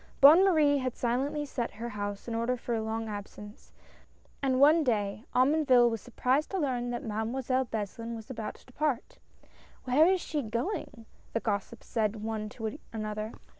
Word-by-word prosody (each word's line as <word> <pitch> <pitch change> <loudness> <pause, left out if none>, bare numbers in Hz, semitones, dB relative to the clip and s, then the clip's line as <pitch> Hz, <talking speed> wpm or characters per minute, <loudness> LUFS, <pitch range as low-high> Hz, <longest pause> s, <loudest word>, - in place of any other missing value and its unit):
Bonne 305 +7 +9
Marie 305 -7 +4
had 255 -2 -2
silently 270 +5 -1
set 245 -4 -3
her 235 +3 -5
house 205 -1 -5
in 235 - -3
order 235 +2 0
for 240 0 -4
a 225 - 0
long 220 +1 -3
absence, 210 0 -9 0.7
and 260 -2 +1
one 305 +4 +6
day 210 -4 -1
Omonville 255 -2 +5
was 225 - -3
surprised 255 +4 0
to 390 - -2
learn 250 -7 -1
that 240 0 -3
Mademoiselle 245 +4 -1
Beslin 230 +1 -4
was 225 +2 -9
about 220 -4 -5
to - - -19
depart. 270 -1 -2 0.7
''Where 300 +8 +5
is 380 - +2
she 305 -3 -2
going?" 240 - -4 0.3
the 230 - +1
gossips 215 +1 -3
said, 215 -2 -1
one 215 -1 -3
to 225 +5 -5
another. 215 0 -4
240 Hz, 170 wpm, -30 LUFS, 220-275 Hz, 0.7 s, Bonne